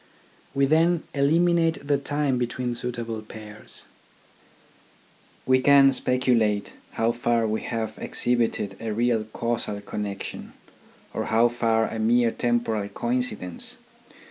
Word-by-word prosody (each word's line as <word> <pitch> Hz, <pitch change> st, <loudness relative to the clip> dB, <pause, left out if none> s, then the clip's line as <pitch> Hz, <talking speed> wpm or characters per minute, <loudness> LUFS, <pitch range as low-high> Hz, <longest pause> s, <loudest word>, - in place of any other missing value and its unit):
We 140 Hz, 0 st, +3 dB
then 165 Hz, +3 st, +3 dB
eliminate 165 Hz, +2 st, +2 dB
the 140 Hz, -1 st, +2 dB
time 140 Hz, -2 st, 0 dB
between 120 Hz, 0 st, -2 dB
suitable 115 Hz, -2 st, -4 dB
pairs. 110 Hz, 0 st, -11 dB, 1.6 s
We 130 Hz, 0 st, +4 dB
can 140 Hz, 0 st, +6 dB
speculate 120 Hz, -5 st, +1 dB, 0.2 s
how 115 Hz, +1 st, +1 dB
far 120 Hz, -1 st, +1 dB
we 110 Hz, 0 st, -1 dB
have 110 Hz, -2 st, -4 dB
ex -, -, -4 dB
hibited 115 Hz, -5 st, 0 dB
a 110 Hz, -2 st, -3 dB
real 115 Hz, -1 st, +1 dB
casual 110 Hz, -1 st, -2 dB
connection, 100 Hz, -1 st, -6 dB, 0.6 s
or -, -, -2 dB
how 115 Hz, +2 st, +3 dB
far 115 Hz, -2 st, +1 dB
a 115 Hz, -, -5 dB
mere 115 Hz, +1 st, +3 dB
temporal 115 Hz, -4 st, -1 dB
coincidence. 120 Hz, -8 st, -3 dB
120 Hz, 115 wpm, -25 LUFS, 110-130 Hz, 1.6 s, can